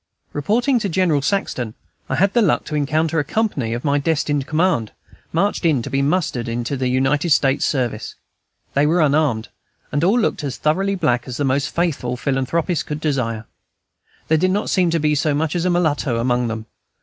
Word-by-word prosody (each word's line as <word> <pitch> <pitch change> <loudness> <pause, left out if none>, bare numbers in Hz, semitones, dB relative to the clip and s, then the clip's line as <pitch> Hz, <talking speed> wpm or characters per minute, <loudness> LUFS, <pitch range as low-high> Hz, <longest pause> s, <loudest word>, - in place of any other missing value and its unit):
Reporting 240 - +1
to 205 -3 -2
General 170 -4 +2
Saxton, 130 - -2 0.3
I - - 0
had 195 +1 +2
the 240 - +4
luck 205 - +2
to - - -7
encounter 155 +2 +1
a - - +1
company 150 - -1
of 120 +4 -4
my 145 0 +2
destined 145 -2 0
command, 155 - +1 0.4
marched 195 +5 0
in 150 -8 +2
to 135 - -6
be 135 +1 +1
mustered 140 -5 0
into 120 +4 -2
the 130 -1 -1
United 135 +6 +1
States 135 -3 +3
service. 120 -6 -2 0.6
They 140 +2 +3
were 170 +3 +2
unarmed, 145 -7 +2 0.4
and 145 +2 0
all 200 +7 +4
looked 210 - 0
as 140 -3 -3
thoroughly 195 +6 +1
black 125 -9 0
as 125 -1 -5
the 145 - -1
most 135 +1 +1
faithful 140 -8 -1
philanthropist 140 +6 -1
could 150 0 -3
desire; 125 -8 -1 0.8
there 160 0 +3
did 185 +3 +2
not 205 +3 -1
seem 180 -3 +3
to 165 0 +1
be 150 0 +2
so 150 0 +1
much 160 +2 -1
as 175 0 0
a - - +2
mulatto 155 -8 +1
among 120 +1 +1
them. 110 -1 -4
150 Hz, 195 wpm, -20 LUFS, 130-170 Hz, 0.8 s, the